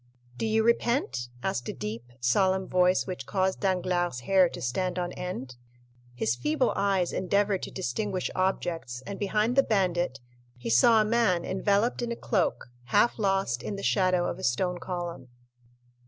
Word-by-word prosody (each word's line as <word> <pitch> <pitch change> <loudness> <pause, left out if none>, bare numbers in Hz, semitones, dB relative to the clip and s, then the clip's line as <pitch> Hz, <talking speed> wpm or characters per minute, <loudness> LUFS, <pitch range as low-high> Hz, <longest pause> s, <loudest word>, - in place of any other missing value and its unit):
"Do 220 - -2
you 220 0 +2
repent?" 235 - +1 0.2
asked 120 - -2
a - - -3
deep, 115 +2 -6
solemn 190 +10 +2
voice, 180 0 +3
which 180 -9 -6
caused 190 -1 0
Danglars' 180 -6 0
hair 185 +6 +4
to - - -8
stand 180 +9 -2
on 175 -1 -2
end. 135 -10 -6 0.6
His 115 -1 0
feeble 300 - 0
eyes 195 -3 +1
endeavored 200 +1 +1
to - - -5
distinguish 185 - -2
objects, 165 -9 -2
and 200 - -6
behind 210 +4 +1
the 275 - +7
bandit 180 - 0 0.4
he 120 -1 -4
saw 220 - +6
a - - +1
man 210 -6 +2
enveloped 200 +5 +1
in 240 -1 -2
a - - -2
cloak, 190 - -1 0.2
half 230 - +2
lost 195 - 0
in 200 - -4
the 200 - -7
shadow 185 -2 +2
of - - -4
a - - -9
stone 175 +8 0
column. 175 -8 -5
185 Hz, 165 wpm, -28 LUFS, 135-200 Hz, 0.6 s, the